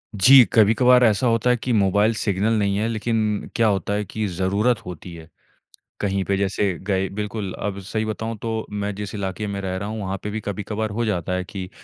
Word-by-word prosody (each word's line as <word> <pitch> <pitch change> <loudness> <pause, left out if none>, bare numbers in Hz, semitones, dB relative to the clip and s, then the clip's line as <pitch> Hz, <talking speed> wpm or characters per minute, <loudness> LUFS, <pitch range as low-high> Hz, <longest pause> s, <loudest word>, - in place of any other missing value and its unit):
जी, 130 +5 +8
कभी-कभार 125 +3 +5
ऐसा 110 +3 +2
होता 115 +2 +2
है 125 - +3
कि 125 +2 -3
मोबाइल 105 +1 +3
सिग्नल 105 +2 +1
नहीं 100 -1 +1
है 110 +2 0
लेकिन 110 -2 -1
क्या 115 -1 +3
होता 100 0 0
है 105 0 0
कि 110 +3 -3
ज़रूरत 100 +6 0
होती 90 0 -8
है। 80 -1 -12 0.7
कहीं 100 -1 0
पे 100 -1 0
जैसे 100 0 0
गए 95 -1 0
बिल्कुल, 105 -1 -4
अब 100 -1 -4
सही 110 +3 -3
बताऊँ 110 +1 -4
तो 110 -1 -3
मैं 105 0 -3
जिस 105 0 -6
इलाके 100 +1 -3
में 100 -1 -4
रह 95 -1 -3
रहा 100 +2 -4
हूँ 110 0 -4
वहाँ 95 0 -3
पे 105 - -3
भी 110 +1 -3
कभी-कभार 105 +1 -3
हो 115 +3 -1
जाता 90 -3 -1
है 90 0 -1
कि 95 0 -7
105 Hz, 215 wpm, -22 LUFS, 95-110 Hz, 0.7 s, जी